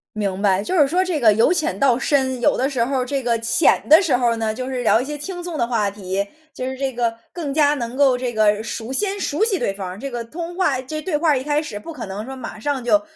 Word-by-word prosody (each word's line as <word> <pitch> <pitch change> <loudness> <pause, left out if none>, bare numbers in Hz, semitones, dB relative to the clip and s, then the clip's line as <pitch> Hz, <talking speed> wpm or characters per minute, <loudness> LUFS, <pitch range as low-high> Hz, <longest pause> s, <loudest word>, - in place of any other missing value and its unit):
明 200 -2 -2
白， 195 -1 +3
就 365 - -2
是 295 -5 +5
说 365 +5 +1
这 330 -6 -2
个 220 -3 +6
由 225 - +3
浅 335 -1 -1
到 260 -3 +4
深， 265 -2 +1
有 - - +3
的 265 +2 +1
时 255 -5 0
候 265 +3 -1
儿 250 - -2
这 275 0 -2
个 235 -1 +1
浅 230 +7 +2
的 315 +5 +8
时 320 -9 +2
候 245 -1 +2
儿 - - 0
呢， 220 -1 -1
就 255 +3 -5
是 255 -2 -3
聊 225 - +4
一 255 - -3
些 295 +1 -5
轻 355 +4 -6
松 345 -2 -5
的 235 - +1
话 225 -4 0
题， 195 0 -3 0.3
就 255 - -5
是 260 0 -3
这 270 0 -1
个 235 -2 -1
更 310 -6 -4
加 295 0 +3
能 240 -3 -4
够 265 -2 +4
这 245 -1 -3
个 215 -1 +3
熟 230 +2 -5
先 400 +8 0
熟 325 -2 -2
悉 420 -5 +1
对 195 - -1
方， 190 -1 -6
这 275 +3 -6
个 240 - -3
通 335 +7 -6
话 285 -9 +1
这 310 +4 -6
个 - - -4
对 345 -1 -2
话 310 +2 +2
儿 280 - +3
一 260 - -6
开 295 0 +1
始 205 -9 -6
不 330 +9 -9
可 - - -6
能 200 +3 -5
说 265 +1 -7
马 255 -4 -8
上 270 +2 -2
就 305 +6 +3
260 Hz, 315 characters per minute, -21 LUFS, 230-300 Hz, 0.3 s, 的